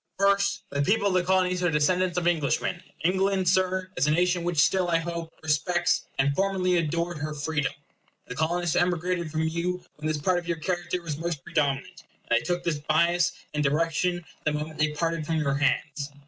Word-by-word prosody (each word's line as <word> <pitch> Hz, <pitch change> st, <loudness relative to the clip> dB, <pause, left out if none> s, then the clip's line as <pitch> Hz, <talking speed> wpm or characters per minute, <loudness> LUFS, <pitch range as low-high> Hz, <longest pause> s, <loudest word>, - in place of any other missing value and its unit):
First, 200 Hz, -1 st, +2 dB
the 140 Hz, 0 st, 0 dB
people 200 Hz, +6 st, +2 dB
of -, -, -1 dB
the 185 Hz, -1 st, +3 dB
Colonies 180 Hz, 0 st, +2 dB
are 175 Hz, -, +2 dB
descendants 175 Hz, +4 st, +1 dB
of 175 Hz, -1 st, +1 dB
Englishmen. 170 Hz, +2 st, 0 dB, 0.2 s
England, 190 Hz, +1 st, +1 dB
Sir, 185 Hz, 0 st, +1 dB
is 140 Hz, -, +1 dB
a -, -, +3 dB
nation 175 Hz, +2 st, +2 dB
which 175 Hz, -1 st, -2 dB
still, 180 Hz, +5 st, +3 dB
I 170 Hz, -1 st, +3 dB
hope, 165 Hz, 0 st, -4 dB
respects, 165 Hz, +3 st, +1 dB
and 140 Hz, +1 st, +2 dB
formerly 190 Hz, -1 st, +1 dB
adored, 170 Hz, +1 st, -1 dB
her 150 Hz, +1 st, -4 dB
freedom. 145 Hz, -1 st, -1 dB, 0.5 s
The -, -, -7 dB
Colonists 170 Hz, +4 st, 0 dB
emigrated 175 Hz, -1 st, 0 dB
from 155 Hz, +1 st, -1 dB
you 170 Hz, +3 st, -2 dB
when 150 Hz, +1 st, -4 dB
this 155 Hz, -1 st, 0 dB
part 175 Hz, +5 st, +1 dB
of 175 Hz, -, -11 dB
your 170 Hz, -1 st, -1 dB
character 175 Hz, +2 st, -2 dB
was 155 Hz, -4 st, -4 dB
most 165 Hz, -4 st, -3 dB
predominant; 140 Hz, -3 st, -1 dB, 0.3 s
and -, -, +3 dB
they -, -, -10 dB
took 175 Hz, 0 st, -1 dB
this 160 Hz, -4 st, -1 dB
bias 170 Hz, +3 st, +2 dB, 0.2 s
and 150 Hz, 0 st, 0 dB
direction 165 Hz, +4 st, 0 dB, 0.2 s
the 150 Hz, -, +1 dB
moment 150 Hz, +1 st, -4 dB
they 150 Hz, -, +4 dB
parted 165 Hz, +1 st, -1 dB
from 160 Hz, +2 st, -2 dB
your 150 Hz, -3 st, +1 dB
hands. 140 Hz, 0 st, 0 dB
170 Hz, 195 wpm, -26 LUFS, 150-180 Hz, 0.5 s, they